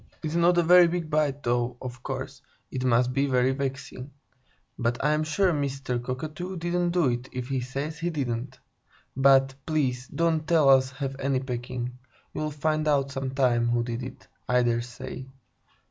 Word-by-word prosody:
"It's 155 -1 -3
not 170 +1 +4
a 175 - +5
very 175 +1 +7
big 170 -2 -3
bite, 145 -2 +1
though, 120 0 0
of 125 -1 -7
course, 130 +1 -5 0.3
it 130 -1 -3
must 125 0 +3
be 140 +2 +1
very 130 -1 +2
vexing. 135 -1 -4 0.7
But 120 0 0
I'm 150 +1 +2
sure 175 +4 +2
Mr. 135 -4 -2
Cockatoo 155 +9 -5
didn't 175 +1 0
do 170 -4 +2
it, 120 +2 -3
if 125 0 -5
he 135 -2 0
says 140 +6 -4
he 175 0 -1
didn't. 130 -4 -3 0.6
But, 135 0 +5
please, 130 -5 0
don't 160 0 0
let 170 -1 +5
us 135 -3 +5
have 135 0 -5
any 135 -1 +1
pecking. 125 -1 -5 0.3
You'll 155 0 -2
find 155 +1 -1
out, 140 -2 +2
sometime, 130 -3 +1
who 120 0 +1
did 120 0 -4
it, 125 - -9 0.2
I 125 0 +4
dare 120 -1 +1
say." 125 +2 -8
135 Hz, 170 wpm, -26 LUFS, 125-155 Hz, 0.7 s, very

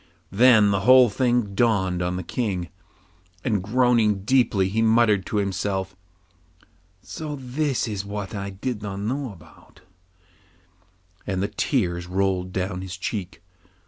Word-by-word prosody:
Then 110 -1 +5
the 100 - +1
whole 125 +2 +6
thing 120 -3 0
dawned 95 -5 +1
on 90 0 -1
the 90 - -4
King, 90 -3 -3 0.7
and 105 -6 0
groaning 110 -2 +2
deeply 110 -5 +2
he 110 +4 -1
muttered 110 -4 +3
to 105 - -2
himself 95 -1 -2 1.1
'So 155 -2 -6
this 135 0 -1
is 100 -3 -3
what 100 +1 -6
I 100 -1 -4
did 105 +3 -5
not 100 -2 -5
know 125 +5 -3
about,' 85 -5 -18 1.5
and 95 -1 -1
the - - 0
tears 90 - -1
rolled 95 0 -1
down 95 0 -3
his 95 -1 -7
cheeks. 95 -1 -4
100 Hz, 135 wpm, -24 LUFS, 95-120 Hz, 1.5 s, whole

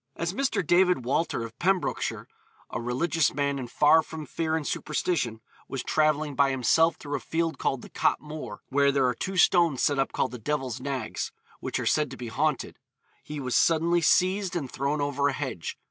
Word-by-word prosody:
As 170 +1 -2
Mr. 220 -6 0
David 180 -5 +3
Walter, 135 -2 0
of 115 0 -9
Pembrokeshire, 190 0 0 0.4
'a 120 - -3
religious 140 +5 +1
man, 140 -1 0
and 125 -2 -6
far 150 +5 +5
from 155 -1 -8
fear 160 0 -2
and 160 -2 -2
superstition,' 140 -9 -1 0.3
was 135 - -4
travelling 155 -1 +1
by 140 0 +3
himself 140 +6 +3
through 145 -2 -5
a - - -1
field 165 +2 -2
called 135 - -1
the - - -11
Cot - - +1
Moor, 150 -9 -8
where 140 +1 +3
there 135 -1 +2
are 125 - +2
two 190 +9 -4
stones 170 -5 +4
set 145 -1 +2
up 135 - +1
called 130 - -1
the 125 - -7
Devil's 130 -1 -2
Nags, 130 -4 -3 0.3
which - - -3
are - - -3
said 150 -2 +2
to 135 - -9
be 120 -2 -6
haunted, 145 +3 -1 0.4
he 150 0 -7
was 130 -3 -2
suddenly 170 +1 +3
seized 185 +3 +2
and 140 -7 -3
thrown 140 +2 -1
over 145 0 +1
a 140 - 0
hedge. 135 - -4
145 Hz, 195 wpm, -27 LUFS, 130-165 Hz, 0.4 s, far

